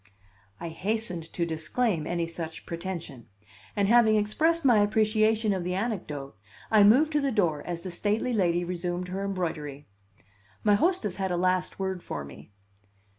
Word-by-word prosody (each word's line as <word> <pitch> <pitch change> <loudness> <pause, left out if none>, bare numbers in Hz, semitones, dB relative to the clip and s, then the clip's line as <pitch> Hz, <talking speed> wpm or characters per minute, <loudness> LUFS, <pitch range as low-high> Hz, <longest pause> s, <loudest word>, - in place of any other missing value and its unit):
I 170 - -5
hastened 180 -1 -3
to 170 - -1
disclaim 160 +2 -1
any 170 -1 -1
such 165 -1 -7
pretension; 170 -8 -6 0.5
and 200 -1 +2
having 225 -1 +5
expressed 310 +10 +1
my 240 -5 +6
appreciation 215 +1 +2
of 185 -2 -2
the 180 +1 -2
anecdote, 170 - -4 0.4
I 215 -2 +7
moved 265 +10 +5
to 300 -1 +1
the 275 -1 0
door 175 -10 +1
as 170 -1 -4
the 185 - -5
stately 210 +7 0
lady 175 -5 +2
resumed 180 0 -3
her 190 +2 -3
embroidery. 160 -7 -3 0.8
My 210 - +4
hostess 230 - +1
had 190 -1 -1
a 175 - 0
last 185 0 0
word 190 -2 -3
for 70 - -5
me. 70 +3 -13
185 Hz, 160 wpm, -27 LUFS, 170-215 Hz, 0.8 s, I